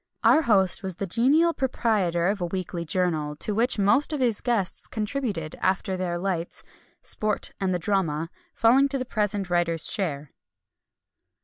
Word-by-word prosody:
Our 315 - +5
host 200 - +3
was 190 -3 -2
the 195 - -4
genial 275 - +3
proprietor 210 - 0
of 200 +1 0
a 175 - -1
weekly 180 -1 -4
journal, 155 -4 -1
to 210 - +1
which 230 +4 +1
most 210 +10 +3
of 300 - -2
his 240 -5 +1
guests 225 -7 -1
contributed, 215 - -3
after 190 +1 0
their 180 -2 -2
lights; 175 -2 -3 0.4
"sport 215 -1 -1
and 190 -1 0
the 180 - +1
drama" 165 -3 -1 0.2
falling 255 +5 +4
to 275 - 0
the 255 - -4
present 205 -5 -2
writer's 170 -2 +2
share. 150 -7 -2
195 Hz, 155 wpm, -25 LUFS, 175-230 Hz, 0.4 s, Our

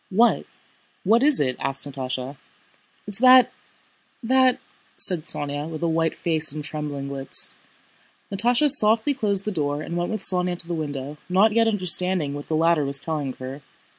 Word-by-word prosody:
"What? 230 +5 +2 0.6
What 225 +5 +3
is 290 0 +4
it?" 130 -3 -1
asked 135 +1 -3
Natásha. 130 0 -5 0.7
"It's 205 0 -3
that, 255 0 +6 0.7
that..." 255 +1 +3 0.4
said 175 -5 +2
Sónya, 145 +1 -2
with 160 0 -6
a - - +1
white 165 0 -1
face 160 -3 +1
and 150 +1 -5
trembling 145 -2 -5
lips. 135 -1 -2 0.8
Natásha 245 +8 +2
softly 225 +1 +5
closed 200 -7 -1
the 215 - -2
door 145 -4 -2
and 170 - -6
went 175 0 -2
with 215 -3 -4
Sónya 180 -1 0
to 170 - -3
the 175 - -4
window, 145 -2 -5
not 195 +4 +4
yet 225 +1 +2
understanding 180 -6 +1
what 145 0 -8
the 160 - -1
latter 165 -1 +2
was 140 0 -2
telling 145 -3 -4
her. 130 +3 -9
165 Hz, 165 wpm, -23 LUFS, 145-210 Hz, 0.8 s, that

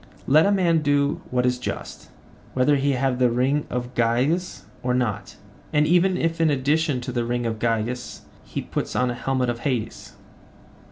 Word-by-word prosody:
Let 155 +6 +5
a - - +3
man 175 -5 +2
do 145 -1 +1
what 125 0 +1
is 125 0 +1
just, - - -6 0.5
whether 130 +3 +3
he 140 0 +1
have 130 -1 0
the 125 -1 +4
ring 130 +5 0
of 125 0 -4
Gyges 125 +10 0 0.2
or 125 0 0
not, 120 -5 -2 0.4
and 150 0 +3
even 180 +3 +3
if 165 -1 -1
in 160 - +4
addition 145 0 +1
to 125 - -5
the 120 -1 -1
ring 120 +1 -2
of 110 -1 -2
Gyges 115 +2 -2 0.2
he - - -5
put - - -4
on 125 0 +2
the - - -1
helmet 130 0 -1
of 120 - -6
Hades. 120 -4 -3
130 Hz, 180 wpm, -23 LUFS, 125-150 Hz, 0.5 s, Let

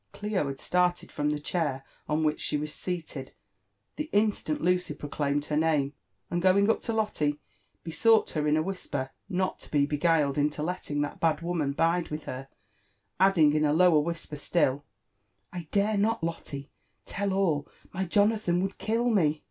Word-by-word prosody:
Clio 205 -7 -1
had 135 -1 -5
started 180 0 +1
from 150 0 -1
the 150 - 0
chair 145 -4 -2 0.3
on 155 +1 +1
which 155 0 0
she - - 0
was 150 0 -4
seated 160 -7 -5 0.6
the 305 +1 -3
in 210 +1 +4
stant 155 -6 -4
Lucy 180 +1 +1
proclaimed 145 0 -2
her 150 - -2
name, 150 -3 +2 0.4
and 175 - 0
going 200 +3 +5
up - - -2
to 230 - -3
Lotte, 210 -10 0 0.5
besought 220 +7 +3
her 150 -1 -1
in 150 +1 +3
a 155 - +1
whisper 145 -8 -4 0.2
not 185 -1 -1
to - - -13
be 145 -2 +3
beguiled 150 -1 +2
into 150 +1 0
letting 155 -4 -2
that 145 - -3
bad 160 -1 +1
woman 165 -5 -1
bide 165 +3 +1
with 150 0 -5
her; 130 +1 -6 0.7
adding 175 -6 +5
in 155 0 +2
a 150 -1 +3
lower 170 -1 +5
whisper 165 -1 -3
still, 145 -2 +1 0.7
I 175 -3 -6
dare 205 +1 +1
not, 220 -2 +1
Lotte, 145 -4 -4 0.4
tell 200 0 -2
all! 170 -7 +1
— - - -27
my 190 +1 -1
Jonathan 205 -1 +2
would 195 0 -4
kill 230 +3 0
me. 160 -10 +2
165 Hz, 180 wpm, -28 LUFS, 150-190 Hz, 0.7 s, going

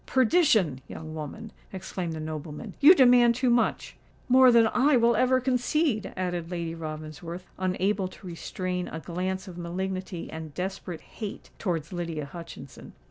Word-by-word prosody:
"Perdition! 225 - +3
young 155 0 -8
woman," 160 +8 -7 0.2
exclaimed 180 -2 -5
the 160 - -5
nobleman; 155 -1 -6
"you 310 +6 +9
demand 245 -4 +6
too 250 0 +2
much!" 240 0 0 0.3
"More 255 0 +7
than 230 -1 +6
I 260 +5 +3
will 235 0 +4
ever 255 +3 +3
concede," 250 -2 0
added 175 -2 -2
Lady 170 -2 -3
Ravensworth, 160 +2 -7
unable 190 +1 0
to 185 - -14
restrain 180 +1 -4
a 160 - -6
glance 185 +3 -3
of 175 -1 -9
malignity 185 +1 -4
and 160 -2 -8
desperate 185 -2 -4
hate 210 -3 -8
towards 170 -3 -2
Lydia 165 -4 -3
Hutchinson. 145 -3 -10
185 Hz, 145 wpm, -27 LUFS, 165-235 Hz, 0.3 s, you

